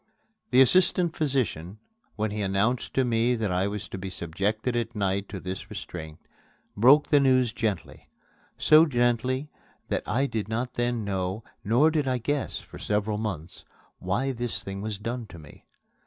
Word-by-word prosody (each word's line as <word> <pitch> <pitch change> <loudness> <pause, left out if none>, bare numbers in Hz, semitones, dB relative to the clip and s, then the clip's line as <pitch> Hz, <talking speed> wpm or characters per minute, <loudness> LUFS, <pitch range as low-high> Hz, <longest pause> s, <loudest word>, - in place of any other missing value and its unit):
The 130 0 +6
assistant 175 +2 +3
physician, 120 - -1 0.4
when 110 0 -1
he 105 0 -3
announced 100 +5 0
to 130 - +3
me 120 +1 +2
that 110 -4 -1
I 90 +2 +1
was 105 0 -5
to 95 - -6
be 95 +1 -5
subjected 100 +8 -2
at 120 0 -2
night 100 -1 -1
to 100 - -6
this 95 +1 -6
restraint, 80 -3 -7 0.6
broke 130 +8 +6
the 145 - +5
news 130 -4 +3
gently 105 -5 -3 0.5
so 155 +2 +6
gently 125 +2 0 0.4
that - - 0
I 135 +4 +1
did 110 -6 -3
not 120 +3 -2
then 120 -2 -1
know, 95 +1 -2 0.2
nor 125 +10 +4
did 150 -3 0
I 130 -1 +1
guess 145 +4 -2
for - - -11
several 105 0 0
months, 90 -5 -5 0.4
why 120 +9 -1
this 120 -2 -3
thing 95 0 -6
was 105 -1 -3
done 115 +2 -4
to 85 - -12
me. 75 -2 -15
110 Hz, 170 wpm, -27 LUFS, 100-130 Hz, 0.6 s, The